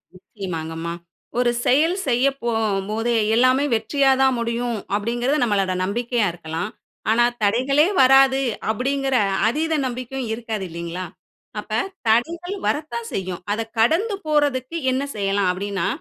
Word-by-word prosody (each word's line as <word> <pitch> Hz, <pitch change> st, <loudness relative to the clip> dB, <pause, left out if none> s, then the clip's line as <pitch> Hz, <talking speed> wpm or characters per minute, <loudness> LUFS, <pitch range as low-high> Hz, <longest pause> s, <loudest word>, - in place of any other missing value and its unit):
நிச்சயமாங்கம்மா. 165 Hz, -4 st, -6 dB, 0.5 s
ஒரு 245 Hz, -1 st, +3 dB
செயல் 320 Hz, +8 st, +3 dB
செய்ய 245 Hz, +1 st, +2 dB, 0.2 s
போகும்போதே 225 Hz, 0 st, 0 dB, 0.2 s
எல்லாமே 255 Hz, +3 st, +4 dB
வெற்றியா 270 Hz, +5 st, +2 dB
தான் 265 Hz, -1 st, +4 dB
முடியும். 235 Hz, 0 st, -2 dB, 0.2 s
அப்பிடிங்கிறது 240 Hz, +7 st, 0 dB
நம்மளோட 195 Hz, -4 st, +1 dB
நம்பிக்கையா 235 Hz, +2 st, 0 dB
இருக்கலாம். 165 Hz, +3 st, -5 dB, 0.4 s
ஆனா, 235 Hz, +2 st, +4 dB, 0.2 s
தடைகளே 265 Hz, -, +3 dB
வராது 270 Hz, 0 st, +6 dB, 0.3 s
அப்பிடிங்கிற 270 Hz, +3 st, 0 dB, 0.3 s
அதீத 315 Hz, +6 st, 0 dB
நம்பிக்கையும் 255 Hz, 0 st, -4 dB
இருக்காது 225 Hz, -3 st, -4 dB
இல்லீங்களா! 170 Hz, +2 st, -5 dB, 0.5 s
அப்ப 210 Hz, -, -10 dB, 0.4 s
தடைகள் 340 Hz, -, +1 dB
வரத்தான் 240 Hz, -7 st, -2 dB
செய்யும். 185 Hz, -2 st, -3 dB
அத 215 Hz, -, -1 dB, 0.2 s
கடந்து 345 Hz, -, +2 dB
போறதுக்கு 290 Hz, -1 st, +1 dB
என்ன 260 Hz, +2 st, 0 dB
செய்யலாம்? 195 Hz, -2 st, +1 dB
அப்பிடின்னா 195 Hz, 0 st, -2 dB
235 Hz, 115 wpm, -22 LUFS, 200-270 Hz, 0.5 s, வராது